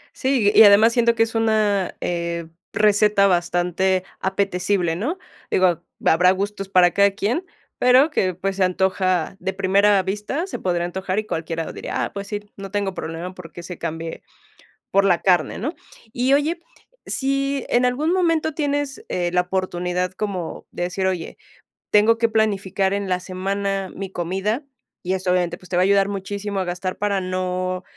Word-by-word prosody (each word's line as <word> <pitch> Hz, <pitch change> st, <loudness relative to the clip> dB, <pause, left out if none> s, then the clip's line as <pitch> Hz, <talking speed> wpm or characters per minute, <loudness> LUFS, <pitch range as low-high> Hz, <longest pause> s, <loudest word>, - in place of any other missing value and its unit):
Sí, 255 Hz, -6 st, +2 dB
y -, -, +8 dB
además 215 Hz, +3 st, +7 dB
siento 235 Hz, -1 st, +3 dB
que 225 Hz, -, +4 dB
es 225 Hz, -, -4 dB
una, 215 Hz, -4 st, +1 dB
eh, 170 Hz, -1 st, -2 dB, 0.3 s
receta 210 Hz, -1 st, +4 dB
bastante 180 Hz, +1 st, +1 dB, 0.2 s
apetecible, 190 Hz, -2 st, 0 dB
¿no? 295 Hz, -, -2 dB, 0.3 s
Digo, 180 Hz, -3 st, +3 dB, 0.2 s
habrá 180 Hz, +3 st, +5 dB
gustos 195 Hz, 0 st, -3 dB
para 180 Hz, -2 st, +5 dB
cada 200 Hz, +3 st, +4 dB
quien, 220 Hz, -, -1 dB, 0.4 s
pero 255 Hz, +5 st, +5 dB
que, 185 Hz, -, 0 dB
pues, 195 Hz, +1 st, -3 dB
se 190 Hz, -, +3 dB
antoja 185 Hz, -1 st, +1 dB
de 190 Hz, +1 st, -3 dB
primera 195 Hz, +1 st, +3 dB
vista, 210 Hz, -, -3 dB
se 390 Hz, -, -6 dB
podría 175 Hz, -2 st, 0 dB
antojar 190 Hz, +2 st, -3 dB
y 215 Hz, -, 0 dB
cualquiera 165 Hz, -4 st, -3 dB
diría: -, -, -3 dB
"Ah, -, -, -8 dB
pues 200 Hz, 0 st, -6 dB
sí, 205 Hz, 0 st, -4 dB, 0.2 s
no 195 Hz, 0 st, -7 dB
tengo 200 Hz, -1 st, -2 dB
problema 170 Hz, +2 st, -6 dB
porque 175 Hz, -2 st, -10 dB
se 175 Hz, 0 st, -7 dB
cambie 165 Hz, +1 st, -5 dB, 0.7 s
por 195 Hz, 0 st, +3 dB
la 180 Hz, -3 st, +3 dB
carne", 180 Hz, -3 st, +2 dB
¿no? 300 Hz, -, -3 dB, 0.4 s
Y 250 Hz, +3 st, +1 dB
oye, 305 Hz, +4 st, +1 dB, 0.5 s
si 275 Hz, 0 st, -1 dB
en 245 Hz, +1 st, +3 dB
algún 285 Hz, +7 st, +1 dB
momento 330 Hz, -4 st, +1 dB
tienes, 290 Hz, -2 st, -2 dB
eh, 175 Hz, -1 st, -1 dB
la 180 Hz, -, +3 dB
oportunidad 180 Hz, -1 st, -2 dB
como 185 Hz, -4 st, -4 dB
de 175 Hz, -, -4 dB
decir: 180 Hz, +2 st, -2 dB
"Oye, 185 Hz, -3 st, -2 dB, 0.5 s
tengo 215 Hz, +2 st, +5 dB
que 230 Hz, -1 st, +2 dB
planificar 200 Hz, -3 st, 0 dB
en 200 Hz, -1 st, -2 dB
la 180 Hz, -, +1 dB
semana 195 Hz, +1 st, -3 dB
mi 195 Hz, -1 st, -6 dB
comida", 190 Hz, -, -2 dB, 0.4 s
y 185 Hz, -, 0 dB
eso, 185 Hz, -1 st, -1 dB
obviamente, 175 Hz, -1 st, 0 dB
pues, 185 Hz, -, -16 dB
te 175 Hz, -, -3 dB
va 180 Hz, -, +3 dB
a -, -, +5 dB
ayudar 195 Hz, 0 st, +3 dB
muchísimo 200 Hz, 0 st, -4 dB
a -, -, 0 dB
gastar 180 Hz, +1 st, -4 dB
para 200 Hz, -1 st, 0 dB
no, 185 Hz, 0 st, -2 dB
195 Hz, 170 wpm, -22 LUFS, 180-215 Hz, 0.7 s, y